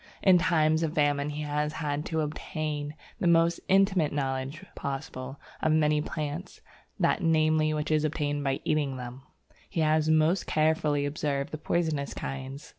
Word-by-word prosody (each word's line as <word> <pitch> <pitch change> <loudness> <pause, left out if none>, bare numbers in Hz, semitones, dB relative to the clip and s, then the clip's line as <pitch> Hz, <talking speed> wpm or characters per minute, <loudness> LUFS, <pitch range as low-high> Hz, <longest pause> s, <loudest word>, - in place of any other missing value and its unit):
In 185 -2 +6
times 160 -3 +2
of 160 -1 -1
famine 145 -1 +2
he 150 +1 -4
has 150 0 -1
had 150 -1 -2
to 160 -1 0
obtain 150 -1 -4 0.2
the 180 - +1
most 170 0 +4
intimate 190 -5 +3
knowledge 135 +4 -3
possible 135 -1 -5 0.2
of 155 - +2
many 150 -1 +3
plants, 150 +4 -5 0.4
that - - +2
namely 155 -2 +3
which 150 0 -2
is 155 -1 +3
obtained 145 -2 -1
by 135 -1 -1
eating 145 -4 0
them, 125 +1 -7
and 130 - -33
he 165 - -1
has 155 0 +2
most 160 +4 +3
carefully 155 -2 +2
observed 145 -1 -2
the 155 - -5
poisonous 155 -4 -1
kinds. 135 +1 -6
150 Hz, 160 wpm, -28 LUFS, 145-160 Hz, 0.4 s, In